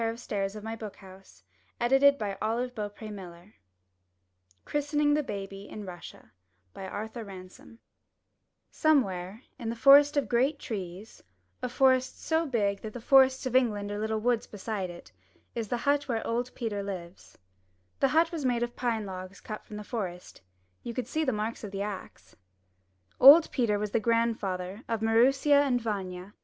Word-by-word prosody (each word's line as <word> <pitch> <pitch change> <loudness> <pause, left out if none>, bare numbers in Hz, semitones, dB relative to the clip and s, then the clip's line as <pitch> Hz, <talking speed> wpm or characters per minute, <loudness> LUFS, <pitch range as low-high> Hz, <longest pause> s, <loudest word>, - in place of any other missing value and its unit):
<Ou3 225 -3 -2
217 205 - -10
M 210 - -9
Y 225 0 -4
BOOK 215 -3 -8
HOUSE 190 0 -16 0.4
i 215 -6 0 1.1
CHRISTENING 295 0 +1
THE 200 -8 -4
IN 210 -1 -7
RUSSIA* 175 -2 -11 0.4
Arthur 215 +4 -6
Ransome 185 -2 -11
BABY 230 - -20 0.9
Somewhere 215 - +1 0.2
in 230 - -4
the 230 - -3
forest 285 +4 +7
of 285 - +1
great 265 +5 +2
trees 195 -3 -7 0.2
— 90 0 -44
a 250 - -2
forest 260 0 +2
so 320 0 0
big 205 -6 0
that 215 -1 -7
the 245 - -6
forests 265 +2 +4
of 255 -1 -2
England 210 -5 +2
are 205 - -3
Httle 220 0 -1
woods 235 0 0
beside 205 -2 -4
it 175 0 -12 0.2
— - - -36
is 230 -2 -3
the 245 - -1
hut 285 +3 +1
where 230 -4 -2
old 240 +2 -1
Peter 220 -4 -3
lives. 185 -3 -8 0.6
The 275 - +4
hut 325 +4 +3
was 325 -4 -4
made 245 -2 +1
of 240 0 -4
pine 230 -4 -1
logs 185 0 -8
cut 215 -1 -7
from 210 - -9
the 210 - -6
forest. 185 - -6 0.4
You 235 - -6
could 255 - -3
see 315 - -1
the 265 - +1
marks 215 +1 -3
of 210 - -5
the 195 0 -3
axe. 205 -2 -8 0.8
Old 295 +5 +9
Peter 230 -6 +1
was 210 0 -3
the 230 - +2
grandfather 215 -4 -1
of 225 -1 -2
Maroosia 270 +6 +4
and 260 -4 +1
Vanya. 195 -4 -5
225 Hz, 165 wpm, -29 LUFS, 200-255 Hz, 1.1 s, Old